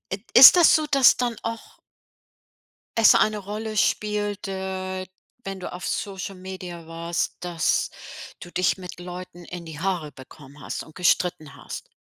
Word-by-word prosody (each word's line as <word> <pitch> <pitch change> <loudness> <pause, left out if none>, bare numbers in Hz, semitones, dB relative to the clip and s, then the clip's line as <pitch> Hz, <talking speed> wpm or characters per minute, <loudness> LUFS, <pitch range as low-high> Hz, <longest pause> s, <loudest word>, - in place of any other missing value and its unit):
It 195 +1 -4
ist 265 +7 +11
das 345 - +6
so, 310 -1 -1
dass 275 -3 +6
dann 240 -2 -2
auch 230 0 -7 1.2
es 225 - +7
eine 215 -1 +2
Rolle 215 +2 -6
spielt, 205 0 -1
äh, 190 -1 -4 0.4
wenn 195 -1 -6
du 180 - -7
auf 180 - -7
Social-Media 185 -3 -6
warst, 170 0 -3
dass 175 -2 0 0.5
du 175 - -10
dich 180 +1 +1
mit 180 -1 -10
Leuten 180 0 -9
in 175 0 -9
die 160 -1 -9
Haare 175 -6 -2
bekommen 140 +2 -14
hast - - -5
und 155 - -17
gestritten 175 -4 0
hast? - - -9
185 Hz, 150 wpm, -24 LUFS, 175-205 Hz, 1.2 s, ist